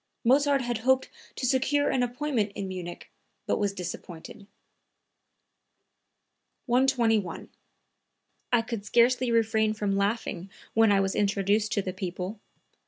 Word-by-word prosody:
Mozart 275 +2 +3
had 240 -2 -2
hoped 260 +3 +2 0.3
to - - -3
secure 270 +3 +2
an 260 - +1
appointment 245 -4 -1
in 195 - -4
Munich, 180 -2 -7 0.3
but - - 0
was 205 -1 +1
disappointed.) 180 +1 -8 2.2
121. 235 -7 +1 1.0
"I 240 -2 +4
could 225 -3 -5
scarcely 240 +3 +3
refrain 220 -1 +2
from 205 -2 -1
laughing 200 -2 -2 0.2
when 225 -1 +4
I 200 - +4
was 195 0 0
introduced 205 +1 +1
to 200 - 0
the 185 - -4
people. 185 +2 -5
220 Hz, 120 wpm, -27 LUFS, 195-245 Hz, 2.2 s, I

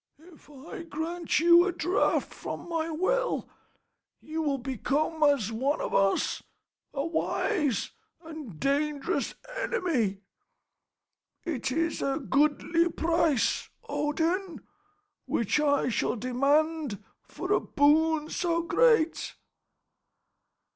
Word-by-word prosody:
If 320 -1 -18
I 290 +4 -9
grant 330 +1 -2
you 345 +2 +6
a - - +1
draught 360 +2 0
from - - -7
my 330 -1 -2
well, 440 +11 0 0.7
you 315 +1 -4
will 285 -3 0
become 275 +5 -2
as 280 -8 +3
one 265 +6 0
of - - -3
us, 195 0 +2 0.5
a 275 0 -2
wise 320 - 0 0.3
and 305 - -9
dangerous 285 +1 -1 0.2
enemy. 275 - -1 1.2
It 265 -6 -2
is 330 +4 -1
a 275 0 0
goodly 305 +4 +2
price, 325 -6 +1 0.2
Odin, 335 +5 -1 0.7
which 230 +5 +1
I 285 -3 +2
shall 235 - 0
demand 275 0 0 0.2
for - - -3
a - - +4
boon 305 +1 +2
so 335 -1 0
great." 450 -4 +2
310 Hz, 105 wpm, -28 LUFS, 275-335 Hz, 1.2 s, you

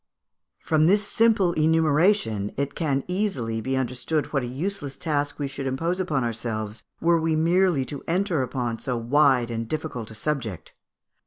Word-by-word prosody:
From 155 0 +3
this 205 +2 +3
simple 215 -7 +3
enumeration, 155 - +2
it 140 +1 -1
can 140 -4 0
easily 180 - -1
be 130 +4 -1
understood 130 +5 -2
what 135 - +2
a 125 - -4
useless 140 +1 -4
task 145 -2 -1
we 145 - -2
should 140 0 -5
impose 165 +8 -1
upon 155 -8 0
ourselves 110 -2 -3 0.2
were 170 -1 +3
we 160 0 +1
merely 170 -2 +2
to 140 +1 -6
enter 175 -3 +1
upon 125 -3 -2
so 125 -2 -2
wide 125 0 +3
and 115 0 -3
difficult 150 -7 -4
a 110 - -9
subject. 115 - -3
145 Hz, 160 wpm, -25 LUFS, 125-165 Hz, 0.2 s, From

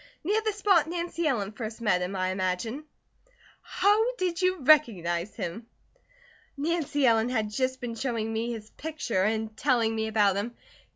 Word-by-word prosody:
Near 415 +6 +1
the 435 0 0
spot 390 -6 +3
Nancy 340 -1 -2
Ellen 210 -8 0
first 220 0 -6
met 210 -6 +2
him 180 +2 -3
I 185 0 0
imagine." 190 +9 -2 0.8
"How 445 +5 +2
did 365 -4 -1
you 370 0 +2
recognize 205 - +3
him?" 225 +7 -5 0.9
"Nancy 295 -2 0
Ellen 225 -1 +4
had 220 -4 -1
just 260 +3 -1
been 245 -2 -4
showing 230 -2 -2
me 230 +2 -1
his 220 -2 -7
picture 300 -11 -3
and 220 +1 -1
telling 235 -3 +1
me 220 0 -1
about 205 -3 +2
him. 230 +4 -3
235 Hz, 160 wpm, -27 LUFS, 215-310 Hz, 0.9 s, Ellen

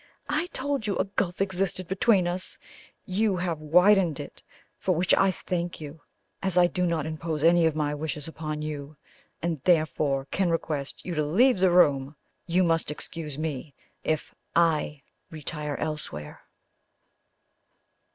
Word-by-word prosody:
I 310 +4 +1
told 280 -7 -2
you 200 - 0
a - - +2
gulf 195 -2 -2
existed 185 -1 -1
between 190 -1 +3
us 180 +1 -2 0.5
you 200 +2 +1
have 175 -3 -2
widened 180 +1 +4
it, - - -8 0.4
for 185 - +1
which 175 +3 +2
I 195 - +5
thank 175 -2 -3
you! 150 0 -9 0.4
As 190 -2 0
I 180 - +7
do 180 0 0
not 165 -3 0
impose 160 -1 -3
any 170 0 +6
of 160 - -1
my 150 -1 0
wishes 150 0 -4
upon 155 -1 -5
you, 150 -1 -6 0.5
and 165 -5 -1
therefore 155 -5 +2
cannot 185 -3 +1
request 150 -4 -3
you 180 - -3
to 155 -2 +1
leave 200 - +4
the 190 0 +5
room, 145 -5 +4 0.3
you 180 +2 +3
must 165 -3 +1
excuse 150 -1 -5
me 150 -3 -4 0.3
if 155 -1 -1 0.2
I 155 -4 +2 0.3
retire 150 -1 -5
elsewhere." 150 - -5
165 Hz, 150 wpm, -27 LUFS, 150-185 Hz, 0.5 s, I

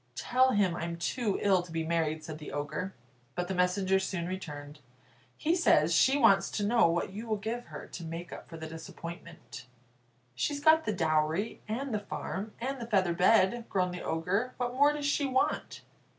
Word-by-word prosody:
"Tell 255 - +3
him 195 -4 +2
I'm 170 0 -4
too 210 +4 -1
ill 190 -3 +4
to 175 -1 -12
be 165 0 -1
married," 160 -1 0
said 155 -1 -7
the 150 - -8
Ogre. 150 +6 -4 0.4
But 180 0 -2
the 190 - -2
messenger 185 +1 +2
soon 190 -3 -3
returned: 150 -5 -6 0.6
"He 325 +3 +1
says 170 - +4
she 265 +11 +5
wants 225 -7 +5
to 205 - 0
know 230 -2 +4
what 170 +2 -1
you 220 +4 -6
will 220 - +1
give 225 +4 -4
her - - -9
to 175 - -8
make 165 +2 -6
up - - -10
for 165 - -8
the 160 - -6
disappointment." 160 -3 -9 0.7
"She's 285 - -1
got 315 +2 +5
the 215 - +1
dowry, 160 +4 0
and 245 +4 -3
the 210 - +1
farm, 205 +1 -5
and 265 +1 -3
the 230 - -5
feather 190 -6 +2
bed," 190 +5 +3
groaned 180 -2 0
the 180 - -6
Ogre; 195 +10 -1
"what 245 0 -2
more 285 +3 +5
does 295 -1 -4
she 285 0 +1
want?" 260 0 0
190 Hz, 195 wpm, -30 LUFS, 165-235 Hz, 0.7 s, she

